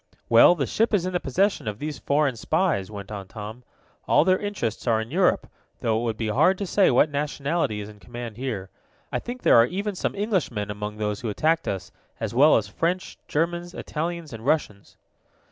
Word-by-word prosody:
"Well, 115 +9 +7
the 140 -5 -1
ship 225 - +1
is 180 -3 +1
in 185 - -3
the 180 - +1
possession 190 - 0
of 105 -1 -3
these 150 +2 -5
foreign 140 -2 +1
spies," 155 - 0
went 100 -1 -8
on 100 -2 -6
Tom. 110 +4 -8 0.4
"All - - +4
their 185 0 +3
interests 200 - -3
are 115 -2 +3
in 110 +2 -5
Europe, 180 +3 +2 0.4
though 110 -1 +1
it - - -3
would 115 -2 -2
be 110 -1 -2
hard 155 - +3
to 200 - -3
say 195 +2 +3
what 140 +4 +4
nationality 145 -5 -1
is 100 - -7
in 105 -1 -13
command 120 -1 -8
here. 110 -8 -4 0.4
I - - 0
think 245 +1 -7
there - - +6
are 115 +1 +6
even 200 +5 -3
some 185 - -2
Englishmen 175 - -1
among 105 +1 -5
those 105 -1 -2
who 115 - -3
attacked 160 +10 +1
us, 95 -2 -3 0.3
as - - -3
well 145 +6 +6
as 110 - -1
French, 170 - -2
Germans, 175 +3 -1
Italians 165 -1 -4
and 110 -1 -8
Russians." 120 -8 -1
135 Hz, 205 wpm, -25 LUFS, 110-175 Hz, 0.4 s, Well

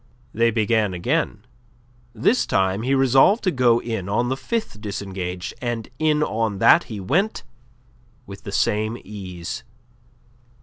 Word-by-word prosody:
They 115 +1 +3
began 110 -3 +1
again. 110 - -1 0.7
This 120 - +1
time 95 +2 +1
he 130 +4 +1
resolved 135 - +4
to 185 - +2
go 125 -4 +3
in 110 -6 -4
on 120 +4 +1
the 130 - 0
fifth 135 - -4
disengage, 95 -3 -5
and 120 -3 -3
in 155 -1 +2
on 110 -5 -1
that - - +5
he 110 -3 -7
went 175 - 0 0.8
with 100 -3 -10
the 100 - -7
same 110 +3 0
ease. 95 +1 -7
115 Hz, 135 wpm, -22 LUFS, 100-130 Hz, 0.8 s, that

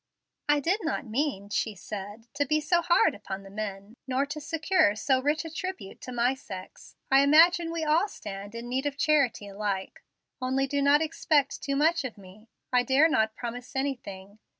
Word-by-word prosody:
"I 295 0 +5
did 355 +9 +1
not 320 -3 -2
mean," 225 -4 -2
she 215 0 -1
said, 205 +3 -8
"to 285 +1 +1
be 305 +2 +2
so 340 +3 +2
hard 345 0 +4
upon 195 -1 -7
the 195 - -12
men, 205 +1 -6
nor 265 +2 +1
to 295 +2 -6
secure 325 - +2
so 260 +4 +1
rich 295 +4 0
a 325 - -6
tribute 370 - -6
to 255 - -7
my 245 +1 +2
sex. 190 -8 -10 0.2
I 270 - +7
imagine 330 +4 +5
we 335 -1 -2
all 315 +6 +3
stand 205 - -8
in 235 +1 -6
need 260 +3 -1
of 280 -1 -4
charity 280 -9 +2
alike. 200 -1 -4 0.4
Only 260 +1 +1
do 280 +1 -1
not 285 +2 +5
expect 300 -3 +1
too 275 -1 -2
much 320 +3 +2
of 250 -5 -6
me. 200 +3 -15 0.2
I 250 - +5
dare 275 +5 +4
not 220 -7 +1
promise 245 +2 -7
anything. 215 -7 -4
265 Hz, 190 wpm, -28 LUFS, 215-305 Hz, 0.4 s, I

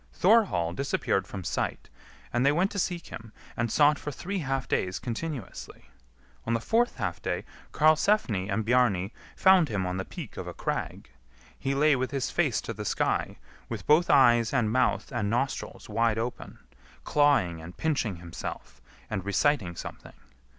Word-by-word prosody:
Thorhall 185 - +3
disappeared 100 -5 -1
from 95 -2 -6
sight, - - -3 0.5
and 120 +1 +2
they 140 - +5
went 180 +6 +1
to 200 - -3
seek 175 -2 -2
him, 115 -1 -9 0.2
and 115 -1 -1
sought 150 +2 +4
for - - -5
three 185 +8 -4
half 135 -4 -2
days 95 0 -1
continuously. 120 - -6 0.6
On 115 - +2
the - - 0
fourth 235 - +1
half - - -3
day - - -2 0.3
Karlsefni 155 - +2
and 105 +2 -1
Bjarni 110 -6 +2 0.2
found 190 -5 +5
him 100 -4 -1
on 90 0 -2
the 95 - -2
peak - - -9
of - - -5
a - - -7
crag. - - -4 0.5
He 135 0 -1
lay 150 +1 +4
with 130 0 -1
his 135 -3 -2
face 150 -10 +1
to 115 - -5
the 105 0 -6
sky, - - -1 0.3
with - - -5
both 155 +4 +4
eyes 120 -4 +5
and 115 -4 +2
mouth 130 +2 +1
and 100 -1 -1
nostrils 125 +5 -2
wide 115 +1 +1
open, 115 +2 -5 0.5
clawing 135 - +2
and 85 +2 -11
pinching 135 - 0
himself, 85 -1 -8 0.3
and 95 - -3
reciting 100 - +1
something. - - -9
120 Hz, 165 wpm, -28 LUFS, 100-150 Hz, 0.6 s, they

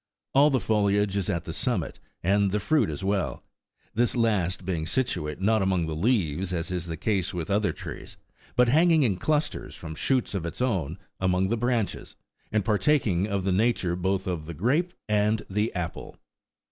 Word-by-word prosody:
All 140 +2 +6
the 135 -3 +2
foliage 105 -1 +1
is 100 -3 0
at 85 -1 -1
the 80 - -5
summit, 105 -2 -1 0.2
and 100 +2 +3
the 105 +2 0
fruit 140 - +2
as 75 +1 -5
well; 100 -1 -1 0.5
this 120 +2 +2
last 95 -7 +1
being 85 -4 -2
situate, 85 - -1
not 110 +2 +2
among 95 -3 +1
the 80 -1 -3
leaves, 95 - +1
as 85 0 -2
is 90 -1 -3
the 80 -1 -4
case 95 -1 -1
with 85 +1 -3
other 100 -2 +2
trees, 75 - -9 0.4
but 125 0 +5
hanging 160 +4 +5
in 105 -8 +1
clusters 150 - -1
from 80 - -7
shoots 130 - 0
of 95 -4 -2
its 85 - -5
own 95 - -1 0.2
among 95 0 +1
the 115 - +2
branches, 120 -2 -1 0.4
and 105 -3 +1
partaking 105 - +2
of 100 -2 -1
the 95 - +1
nature 95 -3 +1
both 95 +1 -1
of 85 -4 -3
the 85 - -6
grape 145 - +1 0.2
and 105 +1 +2
the 105 +3 0
apple. 90 -2 -5
100 Hz, 185 wpm, -26 LUFS, 90-115 Hz, 0.5 s, All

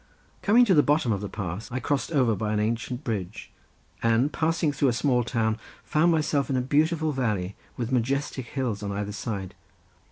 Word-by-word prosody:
Coming 235 +4 +5
to 200 - +4
the 150 - +6
bottom 145 -5 +2
of 100 -2 -1
the 105 - -4
pass 100 +1 -5
I 130 - -2
crossed 145 +4 -1
over 125 -8 +3
by 105 0 -2
an 105 - +1
ancient 115 +4 -2
bridge 105 - -4 0.5
and 115 +5 +2
passing 160 -1 +1
through 145 -1 +1
a 125 - +3
small 125 0 +2
town 110 -2 0 0.2
found 165 +3 +3
myself 150 -3 +1
in 135 - +1
a - - +2
beautiful 155 +4 +1
valley 105 -8 -1 0.2
with 120 0 -3
majestic 130 +1 -1
hills, 125 -7 -2
on 100 -1 -3
either 100 +1 -3
side. 100 -3 -4
125 Hz, 190 wpm, -26 LUFS, 110-145 Hz, 0.5 s, the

